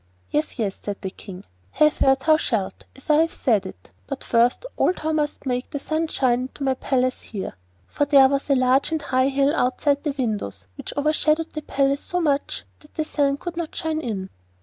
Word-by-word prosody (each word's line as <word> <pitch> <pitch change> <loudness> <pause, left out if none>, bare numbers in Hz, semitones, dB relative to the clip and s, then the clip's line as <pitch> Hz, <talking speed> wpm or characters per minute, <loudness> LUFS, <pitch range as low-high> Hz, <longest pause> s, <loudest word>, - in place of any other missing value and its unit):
'Yes, 300 +1 -1
yes,' 205 -5 -2
said 205 -1 -5
the 190 -2 -4
King. 190 0 -10 0.3
'Have 305 0 +3
her 270 0 +5
thou 310 +4 +3
shalt, 225 -10 -2
as 270 - -17
I 300 -1 +5
have 325 +1 +3
said 220 -6 +1
it; 90 - -13 0.2
but - - -5
first 240 - +2
of - - -9
all - - +3
thou 315 -3 -3
must 300 -2 -1
make 250 -1 -2
the - - -4
sun 315 +3 -1
shine 250 -5 +1
into 260 +2 -6
my 265 -1 +2
palace 255 -1 0
here.' 200 -4 -6 0.3
For 290 - -1
there 275 -2 +7
was 275 +1 -1
a 275 - +5
large 255 +3 +3
and 320 - 0
high 260 -1 +2
hill 275 +1 +2
outside 280 +2 +1
the 295 -3 -2
windows 150 - -3
which - - -7
overshadowed 305 +2 +1
the 305 - -4
palace 275 -1 +1
so 355 - -2
much 290 -4 0 0.2
that 300 - -21
the 310 - -1
sun 280 -2 +1
could 350 +3 -6
not 335 -2 -4
shine 320 -1 -2
in. 200 -8 -4
275 Hz, 215 wpm, -23 LUFS, 250-305 Hz, 0.3 s, there